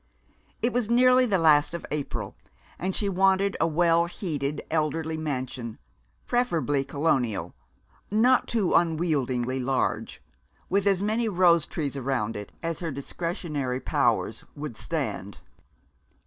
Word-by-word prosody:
It 240 - +2
was 240 -3 0
nearly 255 +1 +5
the 200 -4 +2
last 155 -1 +4
of 170 - -6
April, 145 -2 -4 0.4
and 185 +1 -1
she 205 - +1
wanted 195 +1 +2
a - - +4
well 170 +1 +3
heated 150 -6 -3
elderly 160 0 0
mansion, 130 -6 -4 0.5
preferably 165 - +1
Colonial, 135 -6 0 0.6
not 240 +5 +3
too 215 -6 +1
unwieldily 140 -7 +1
large, 130 +1 -1 0.5
with 200 +1 +1
as 195 -1 +3
many 220 +2 +1
rose 175 -5 +4
trees 145 -4 -3
around 125 -5 -1
it 105 -1 -7
as 165 -1 -2
her 170 - -3
discretionary 145 -2 -3
powers 120 -7 0
would 150 -5 -6
stand. - - -4
160 Hz, 125 wpm, -26 LUFS, 140-190 Hz, 0.6 s, nearly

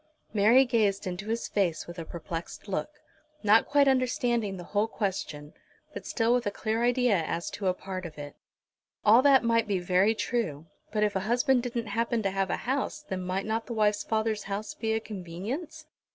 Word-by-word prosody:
Mary 225 +6 +6
gazed 210 -5 +1
into 185 +2 -5
his 230 +1 -2
face 180 -6 0
with 170 0 -9
a 165 - -5
perplexed 170 +3 -7
look, 195 - -2 0.5
not 215 +2 +5
quite 285 -1 +4
understanding 240 -5 +1
the 175 - -7
whole 205 +4 0
question, 180 -9 -4 0.4
but - - -7
still 230 0 +2
with 245 -3 +1
a - - +3
clear 220 +2 -2
idea 245 -3 +3
as 165 +2 -3
to 200 -2 -3
a 185 - +3
part 185 0 -6
of 165 -3 -8
it. 145 0 -8 0.7
All 220 +4 +7
that 275 -2 +5
might 230 -1 +2
be 200 -2 +1
very 185 +4 +2
true, 175 - -2 0.3
but 210 0 +1
if 210 -1 +1
a - - +2
husband 250 +1 +3
didn't 240 -1 -3
happen 230 +2 -1
to 195 - 0
have 195 -1 -1
a - - 0
house 275 +4 -1
then 185 -1 -3
might 185 +2 -2
not 225 +1 -2
the 235 - -4
wife's 210 -2 +2
father's 220 -1 -1
house 200 +2 -4
be 220 0 -2
a 220 - +1
convenience? 220 - -6
215 Hz, 195 wpm, -28 LUFS, 190-235 Hz, 0.7 s, All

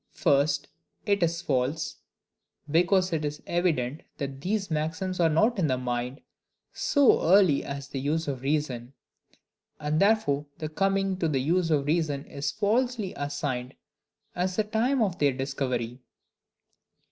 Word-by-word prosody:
First, 145 +1 +2 0.4
it 200 -2 +2
is 170 0 0
false; 140 +3 -1 0.7
because 180 +4 +3
it 155 -1 0
is 150 0 -4
evident 155 -6 0 0.2
these 170 +8 -3
maxims 160 +5 -2
are 165 -2 +4
not 215 +8 +2
in 165 - +2
the 130 -2 +1
mind 125 +2 -3 0.5
so 285 -4 +4
early 180 -4 +5
as 140 0 -6
the 135 - -4
use 155 +4 -1
of 135 -3 -3
reason; 135 -3 -2 0.9
and 150 +1 0
therefore 195 -9 +2
the 155 - -4
coming 195 +3 0
to 170 - 0
the 150 -3 0
use 165 +5 +1
of 145 -3 +2
reason 150 -3 0
is 140 +1 -3
falsely 220 -1 0
assigned 145 -3 -3 0.6
as 180 +1 -1
the 215 - +2
time 225 +4 +1
of 190 -5 -2
their 145 -2 +3
discovery. 130 -2 -3
155 Hz, 140 wpm, -27 LUFS, 140-185 Hz, 0.9 s, early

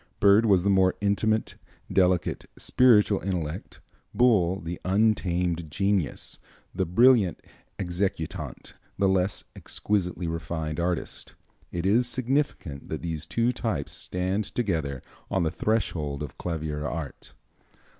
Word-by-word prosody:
Byrd 100 +3 +6
was 95 -4 +4
the 100 - +3
more 95 -1 +4
intimate, 110 +2 +1 0.4
delicate, 90 -2 +1
spiritual 105 -5 +4
intellect; 90 -2 -4 0.3
Bull 95 -7 +3
the 85 0 -6
untamed 90 -5 +1
genius, 95 0 -1 0.3
the 95 - -1
brilliant 110 0 +4 0.4
executant, 90 -3 -3 0.2
the 95 - +3
less 95 0 +1
exquisitely 90 -4 -2
refined 80 -1 -3
artist. 85 -1 -3 0.4
It 85 +1 -3
is 115 +5 +3
significant 125 - -1
that - - -4
these 80 -2 -4
two 115 +7 +1
types 105 - -2
stand 95 +3 -1
together 80 - -2 0.3
on 95 -3 +1
the 80 - 0
threshold 75 -10 -1
of 70 - -7
clavier 80 -3 -3
art." 80 -2 -6
95 Hz, 115 wpm, -26 LUFS, 85-105 Hz, 0.4 s, Byrd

